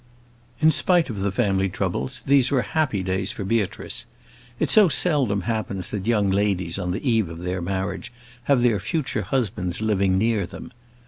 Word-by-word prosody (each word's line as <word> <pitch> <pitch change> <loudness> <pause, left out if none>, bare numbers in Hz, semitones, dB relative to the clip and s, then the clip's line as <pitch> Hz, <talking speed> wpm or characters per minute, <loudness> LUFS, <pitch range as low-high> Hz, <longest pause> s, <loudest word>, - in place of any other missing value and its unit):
In 160 +1 +6
spite 170 -2 +2
of 105 - -5
the 100 0 0
family 95 -2 +1
troubles, 65 -6 -3
these 135 -2 +4
were 130 -4 +1
happy 130 -7 -1
days 95 +3 -1
for 105 - -5
Beatrice. 110 +3 -2 0.5
It - - +1
so 210 -4 +6
seldom 140 - +2
happens 100 -3 -3
that 100 0 -4
young 105 -4 +2
ladies 95 -3 0
on 90 -1 -3
the 100 +10 -3
eve 110 -7 +2
of 85 - -8
their 90 0 -3
marriage 95 +6 -3 0.3
have 130 -3 +3
their 115 -5 +3
future 130 - -2
husbands 100 -5 -2
living 100 -3 +1
near 105 -2 +1
them. - - -10
105 Hz, 175 wpm, -23 LUFS, 95-120 Hz, 0.5 s, In